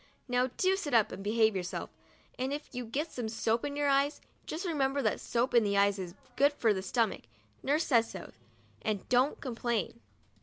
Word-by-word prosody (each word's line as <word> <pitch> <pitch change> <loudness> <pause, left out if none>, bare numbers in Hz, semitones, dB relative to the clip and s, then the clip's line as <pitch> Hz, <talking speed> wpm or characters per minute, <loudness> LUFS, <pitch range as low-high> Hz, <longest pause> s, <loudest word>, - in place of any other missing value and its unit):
Now 250 0 +2
do 375 +1 +3
sit 295 -10 -2
up 220 -3 +4
and 195 - -7
behave 220 0 +3
yourself, 180 -1 -4 0.5
and 260 +2 -1
if 290 0 -5
you 250 -1 -4
get 290 +8 -3
some 235 -3 -4
soap 225 +1 0
in 285 -1 -3
your 290 0 +1
eyes 280 +1 +2 0.3
just 335 +5 -4
remember 280 -5 +1
that 215 - +1
soap 240 +2 0
in 235 -2 +6
the 200 -1 +1
eyes 200 0 +3
is 180 -2 -5
very 250 - -29
good 285 +1 +5
for 225 -6 +2
the 190 - -3
stomach, 225 +2 0 0.4
nurse 300 +4 +1
says 230 -4 +3
so, - - -8 0.5
and 210 -3 -2
don't 255 +4 +3
complain. 235 - -2
245 Hz, 200 wpm, -31 LUFS, 220-280 Hz, 0.5 s, in